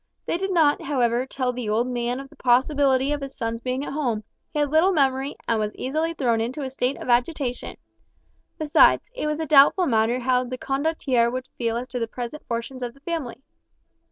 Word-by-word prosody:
They 340 - -1
did 385 0 -2
not, 315 -5 +3
however, 250 -3 0
tell 255 -2 -2
the 240 -3 -4
old 220 +3 +2
man 245 0 -2
of 275 - -8
the - - -19
possibility 265 +2 +2
of 295 -1 -2
his 275 -1 -6
son's 230 -1 -3
being 255 +3 -2
at - - -5
home, 245 -8 -1 0.3
he 310 - -5
had 295 -1 +1
little 325 +5 +4
memory, 270 -4 +1
and 230 -1 +1
was 210 0 -2
easily 315 +5 -2
thrown 235 -6 +1
into 255 +6 -3
a 260 - -4
state 260 +1 -1
of - - -8
agitation; 250 +1 0 0.8
besides, 310 +7 +4
it 400 - -2
was 300 +1 -1
a 320 - -1
doubtful 300 +5 +6
matter 230 -3 +2
how 255 0 +1
the 255 0 -5
Condottiere 270 -4 0
would 255 +1 -4
feel 230 -1 -2
as 245 +1 -4
to 250 - -3
the 230 - -1
present 245 +6 -6
fortunes 235 +2 -4
of 245 0 -4
the - - -19
family. 275 -6 -4
260 Hz, 210 wpm, -24 LUFS, 240-290 Hz, 0.8 s, doubtful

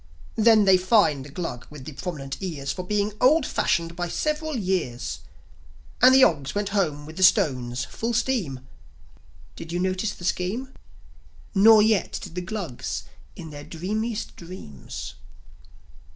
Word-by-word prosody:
Then 220 -1 +5
they 190 -1 +6
fined 180 - +3
the - - -10
Glug 140 -6 -5
with 150 -3 -11
the 155 - -6
prominent 135 -2 -6
ears 145 -7 -3
For 180 - -4
being 205 +2 -1
old 290 +3 +5
fashioned 170 0 0
by 175 0 -2
several 305 - -2
years; 155 - -2 0.8
And 255 +2 +8
the 265 - +7
Ogs 145 - +2
went 205 -1 -1
home 160 -8 -1
with 155 +1 -11
the - - -3
stones, 130 - +3
full 230 - -3
steam. 225 - -1 0.9
Did 165 - -8
you 175 - -1
notice 185 +3 -1
the 175 - -9
scheme? 220 +10 -2 0.8
Nor 215 +2 +7
yet 215 -4 +1
did - - -9
the 180 - -3
Glugs 180 - -4 0.3
in 160 -2 -9
their 145 -1 -8
dreamiest 215 +8 -4
dreams. 170 - -9
185 Hz, 150 wpm, -25 LUFS, 150-215 Hz, 0.9 s, And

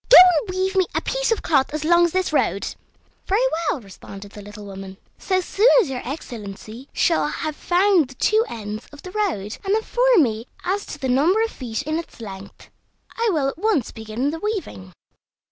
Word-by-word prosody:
Go - - +10
and 360 0 +7
weave 375 +1 -1
me 375 -2 +3
a - - +1
piece - - -1
of 455 - 0
cloth 275 -5 +2
as 305 - -3
long 345 +1 +5
as 345 - -1
this 370 -2 -1
road." 200 - 0 0.5
"Very 425 +6 +2 0.2
well," 265 - -1
responded 195 0 -11
the 210 - -10
little 205 +1 -10
woman; 195 -1 -9 0.2
"so 375 -1 +1
soon 405 +5 +2
as 370 - +1
your 250 - -3
Excellency 235 -2 -8
shall 330 -3 +2
have 310 0 -3
found 360 -3 +3
the 265 - -14
two 435 - +3
ends 215 0 -6
of 290 - -13
the 365 - -8
road, 330 - -2
and 395 +1 +1
informed 485 -2 +3
me 225 -1 -2 0.2
as 395 +3 -1
to - - -7
the 270 - -3
number 315 - +3
of 455 - -2
feet 245 +1 -5
in 310 +2 -1
its 335 - -10
length, 195 -3 -10 0.4
I 460 0 +1
will 295 -6 +1
at 275 - -4
once 405 - +1
begin 220 +5 -3
the 325 - -5
weaving." 345 - -4
305 Hz, 200 wpm, -22 LUFS, -, 0.5 s, Go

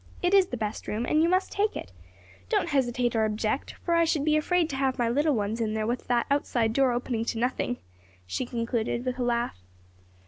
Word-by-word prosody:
"It 355 +2 +2
is 390 -2 +6
the 250 - -4
best 215 -1 -4
room, 220 +3 -2
and 305 +5 +3
you 335 - +3
must 370 +2 +1
take 415 +2 0
it. 95 - -6 0.6
Don't 340 - +1
hesitate 245 -4 +1
or 220 - +3
object, 215 +4 -1
for 340 - +1
I 335 0 +5
should 310 -3 +1
be 305 -1 +3
afraid 335 +2 +2
to - - -3
have 265 -1 +1
my 240 - +1
little 290 +5 +2
ones 215 +2 -1
in 220 -1 -1
there 215 0 -1
with 240 +2 -2
that 240 -1 +2
outside 240 -5 +1
door 270 0 +3
opening 240 -1 -1
on - - -2
to 230 - -2
nothing," 245 +1 -1 0.5
she 95 - -3
concluded, 235 0 -2
with 255 0 -2
a - - +1
laugh. 235 - -1
245 Hz, 230 wpm, -27 LUFS, 230-295 Hz, 0.6 s, is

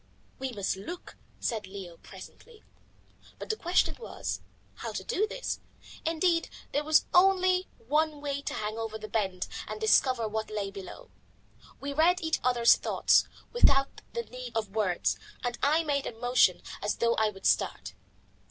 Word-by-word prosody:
"We 265 0 -3
must 200 -4 -2
look," 340 - -8 0.2
said 220 -4 -2
Leo 190 -3 -8
presently. 465 -2 -13 0.7
But - - -3
the - - -1
question 360 -3 +2
was, 470 - -4 0.4
how - - -5
to - - -4
do 435 -2 0
this. - - -4 0.4
Indeed, 330 +1 +1 0.2
there 290 - 0
was 310 +1 +4
only 370 0 +4
one 300 +5 0
way, 280 -1 -3
to - - -4
hang 215 +1 -3
over 225 -1 -3
the 215 0 -7
bend 190 -4 -1 0.2
and - - -5
discover 260 - +3
what 220 +1 -3
lay 205 -2 -3
below. 200 - -10 0.7
We 280 0 -4
read 340 +5 +4
each 320 -2 0
other's 240 -2 +5
thought - - +3 0.3
without 275 - +4
the 470 - -2
need 250 - -7
of 215 -2 -3
words, 195 -5 +1 0.2
and 245 -1 -2
I 310 +4 +3
made 285 -3 0
a 225 - -7
motion 245 -7 +3 0.2
as 205 - 0
though 235 0 +2
I 220 0 +3
would 195 -2 -11
start. 95 +1 +1
255 Hz, 160 wpm, -29 LUFS, 215-330 Hz, 0.7 s, other's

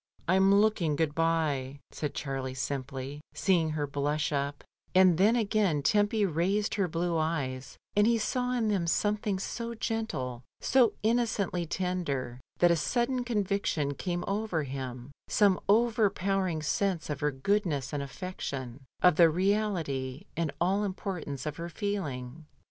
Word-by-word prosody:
"I'm 190 +2 +5
looking 200 -7 +3
good 150 0 0
bye," 150 -5 0
said 150 -2 -4
Qiarlie 135 -2 -4
simply, 135 +1 -4
see 190 -3 +3
ing 160 -1 0
her 145 - 0
blush 145 +2 -1
up; 140 0 -2 0.3
and 185 -3 +6
then 215 +5 +5
again 205 -9 +1
Tempy 205 +5 +3
raised 190 +5 0
her 195 -4 +1
blue 170 +1 -1
eyes, 135 -6 -2 0.2
and 205 +1 +5
he 235 0 +4
saw 250 +3 -1
in 230 -3 +1
them 190 -5 0
something 205 +2 +1
so 235 +4 -4
gentle, 135 - -3 0.2
so 250 -4 +4
innocently 215 -6 +1
tender, 155 -9 -2 0.2
that 175 -1 +5
a - - +4
sudden 245 - 0
conviction 200 - 0
came 175 +4 -3
over 200 -5 -1
him, 130 -1 -6 0.2
some 200 -3 +3
overpowering 195 -6 +2
sense 185 +1 0
of 145 - -3
her 150 - +1
goodness 150 -1 -1
and 145 - -1
affection, 140 -5 -6 0.2
of 180 -3 +6
the 170 -2 +7
reality 165 -8 -1
and 165 -3 -1
all 190 +4 +2
importance 185 -8 -4
of 150 -1 -4
her 170 +1 -5
feeling. 155 - -4
170 Hz, 145 wpm, -29 LUFS, 145-205 Hz, 0.3 s, the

